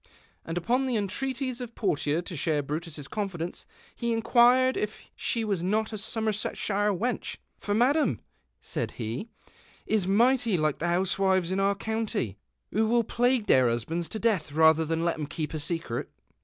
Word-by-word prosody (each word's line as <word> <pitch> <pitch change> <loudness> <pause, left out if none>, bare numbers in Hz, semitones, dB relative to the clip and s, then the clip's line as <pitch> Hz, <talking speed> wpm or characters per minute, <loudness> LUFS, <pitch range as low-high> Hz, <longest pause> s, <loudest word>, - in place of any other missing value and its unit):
"' - - -37
And 165 +1 -3
upon 245 +9 +1
the 250 - 0
entreaties 255 +5 -2
of 240 -1 -7
Portia 155 -4 0
to 175 - -7
share 150 -1 0
lirutuss 150 0 -5
eonfidenee 185 -5 -4 0.3
he 235 -1 -1
inquired 245 +3 +4
if 210 0 -3 0.2
she 230 - -1
was 200 -5 0
not 215 +5 0
a - - -3
Somersetshire 210 -1 0
weneh. 225 +7 -2
"" - - -45
For 205 - -1
Madam," 280 +7 +3 0.4
said - - -3
he, 120 - -4 0.3
" - - -28
is 195 -4 +1
might} 240 +6 +4
like 155 -8 +1
the 170 - -1
housewives 185 0 +1
in 190 - 0
our 200 +1 +2
county, 210 - -2 0.3
who 220 +2 +2
will 235 +1 +3
plague 245 0 +1
their 130 - +5
husbands 160 +9 -2
to - - -4
death 210 -9 0
rather 160 +1 +5
than 165 +1 -1
let 170 -2 0
"em 150 - -3
keeji 155 0 -4
a - - -1
seeret." 150 -6 -2
195 Hz, 175 wpm, -28 LUFS, 165-230 Hz, 0.4 s, their